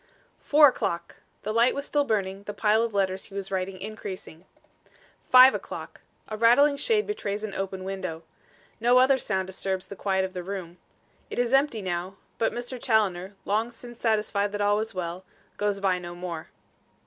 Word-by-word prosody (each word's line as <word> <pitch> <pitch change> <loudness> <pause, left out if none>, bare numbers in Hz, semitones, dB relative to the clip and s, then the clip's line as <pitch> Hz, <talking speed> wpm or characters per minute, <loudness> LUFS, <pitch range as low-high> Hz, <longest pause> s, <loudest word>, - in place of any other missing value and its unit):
Four 295 0 +6
o'clock! 170 -8 -3 0.3
The 215 - -2
light 235 +2 +4
was 280 0 -3
still 290 -1 +1
burning, 195 -4 -1
the 205 - -6
pile 215 +1 +3
of 230 0 -1
letters 190 -1 0
he 200 - -13
was 195 -1 -5
writing 185 0 -2
increasing. 190 -5 -8 0.8
Five 255 +1 +9
o'clock! - - -7 0.3
A 215 - -5
rattling 245 +6 +5
shade 430 - +2
betrays 210 - -3
an 210 -2 -4
open 190 -1 -4
window. 185 -4 -5 0.6
No 240 +2 +4
other 265 +1 +5
sound 190 -5 -1
disturbs 190 0 -3
the 200 - -7
quiet 190 -1 0
of 185 - -7
the 180 - -4
room. 180 -2 -6 0.5
It - - -6
is 245 +1 +1
empty 270 -6 +2
now; 180 +1 -3 0.2
but 225 - +2
Mr. 245 +1 -6
Challoner, 200 -5 +1
long 215 +3 0
since 240 0 -12
satisfied 210 -2 +1
that 205 - -2
all 205 0 +3
was 220 -1 -3
well, 180 0 -4 0.3
goes 205 -1 0
by 190 -2 +1
no 175 -1 -8
more. 175 -3 -6
205 Hz, 180 wpm, -26 LUFS, 190-235 Hz, 0.8 s, Five